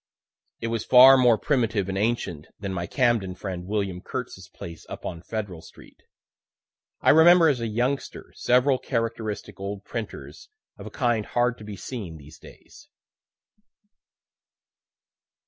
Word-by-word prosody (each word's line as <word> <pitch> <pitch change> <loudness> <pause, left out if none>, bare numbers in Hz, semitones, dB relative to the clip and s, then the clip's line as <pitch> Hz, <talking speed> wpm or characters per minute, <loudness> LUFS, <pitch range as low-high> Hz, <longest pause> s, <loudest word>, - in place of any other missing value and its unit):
It 115 - -2
was 115 -1 -2
far 130 +2 +8
more 125 -3 +4
primitive 115 -7 0
and 95 - -3
ancient 100 -7 -2
than 100 -2 -4
my 85 -1 -3
Camden 115 -8 +1
friend 90 -2 -6
William 100 -3 -2
Kurtz's 95 -8 -7
place 85 -1 -10
up - - -8
on 85 - -5
Federal 100 -4 -5
street. - - -17 1.0
I - - +5
remember, 165 +1 +7
as 135 -4 0
a 115 - -2
youngster, 125 +5 -3
several 130 +2 +2
characteristic 115 -5 -4
old 100 0 -5
printers 115 - -7 0.3
of - - -10
a - - -6
kind 120 -4 0
hard 120 0 0
to - - -10
be 105 -1 -7
seen 95 -6 -7
these 75 +1 -15
days. - - -16
110 Hz, 140 wpm, -25 LUFS, 95-125 Hz, 1.0 s, far